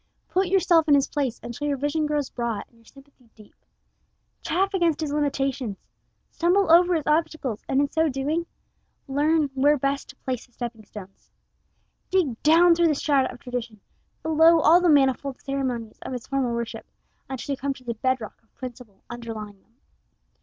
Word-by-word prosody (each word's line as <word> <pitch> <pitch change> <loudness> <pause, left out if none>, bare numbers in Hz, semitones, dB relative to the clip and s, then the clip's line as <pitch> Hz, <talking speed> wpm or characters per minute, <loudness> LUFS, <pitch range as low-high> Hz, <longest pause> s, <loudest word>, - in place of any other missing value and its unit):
Put 375 +1 +1
yourself 350 -3 +3
in 290 - +6
his 280 -1 +2
place 275 -5 -2
until 245 +5 -5
your 285 -1 0
vision 290 +3 -1
grows 295 -2 -2
broad 235 -3 -3
and 235 - -28
your 230 - -25
sympathy 275 -2 -20
deep. 215 -2 -17 0.9
Chafe 385 +4 0
against 340 -5 +1
his 305 -2 -2
limitations. 270 -6 -1 0.5
Stumble 355 +1 +2
over 350 +1 +6
his 315 - -2
obstacles, 300 -7 -1
and 270 - +2
in 285 - +3
so 320 +2 +1
doing 295 +6 -2 0.6
learn 295 +1 +1
where 285 +3 +3
best 275 +1 -2
to 280 - -11
place 255 -3 -5
the 245 - -34
stepping 235 -3 -7
stones. 195 -2 -12 0.8
Dig 320 -12 0
down 335 +3 +6
through 340 0 +3
the 305 - +2
strata 275 -2 +1
of 245 - -13
tradition, 240 -3 -5 0.4
below 320 +1 +5
all 340 +4 +6
the 355 - +3
manifold 275 -2 +2
ceremonies 255 -5 -4
of - - -6
his 250 -2 -6
formal 260 -4 -1
worship, 235 -1 -5 0.4
until 270 +1 -4
you - - -4
come 275 0 -2
to 255 - -15
the 240 -1 -3
bed 260 +3 0
rock 220 - -10
of 225 - -38
principle 245 -5 -10
underlying 220 -4 -8
them. 230 - -37
275 Hz, 180 wpm, -24 LUFS, 240-315 Hz, 0.9 s, in